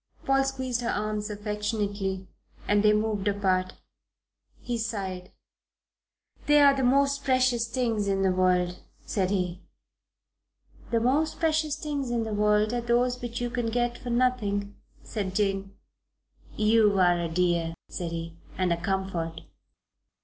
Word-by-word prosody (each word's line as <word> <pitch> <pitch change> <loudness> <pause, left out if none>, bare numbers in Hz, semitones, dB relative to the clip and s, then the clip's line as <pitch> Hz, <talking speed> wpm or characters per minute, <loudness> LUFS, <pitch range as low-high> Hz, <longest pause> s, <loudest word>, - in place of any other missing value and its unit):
Paul 270 0 +3
squeezed 260 -2 -2
her 235 - -2
arms 210 0 -2
affectionately 205 -2 -3 0.4
and 205 0 +3
they 210 0 +5
moved 210 -1 0
apart. 190 -2 +1 0.9
He 240 -1 -3
sighed. 190 -5 -4 1.2
"They're 290 -1 +6
the 270 - -1
most 280 +2 +3
precious 255 -3 +2
things 230 -4 -1
in 195 -1 +1
the 190 - +3
world," 180 -1 +1 0.3
said 190 -3 0
he. 180 -2 -1 1.3
"The 230 - +2
most 280 +7 +1
precious 315 -2 +1
things 290 -4 -3
in 235 -1 0
the 220 -1 -4
world 210 +1 +2
are 240 - 0
those 245 +1 +1
which 240 -1 -4
you 240 0 -2
can 240 -1 -1
get 240 +1 0
for 245 - -7
nothing," 220 -5 0 0.3
said 195 -4 -4
Jane. 195 -1 -1 0.8
"You're 215 -2 +4
a 175 -2 +3
dear," 170 -1 0
said 170 -2 -5
he, 165 0 -6 0.2
"and 185 -2 +2
a 170 - -4
comfort." 175 -3 -2
210 Hz, 135 wpm, -27 LUFS, 190-245 Hz, 1.3 s, They're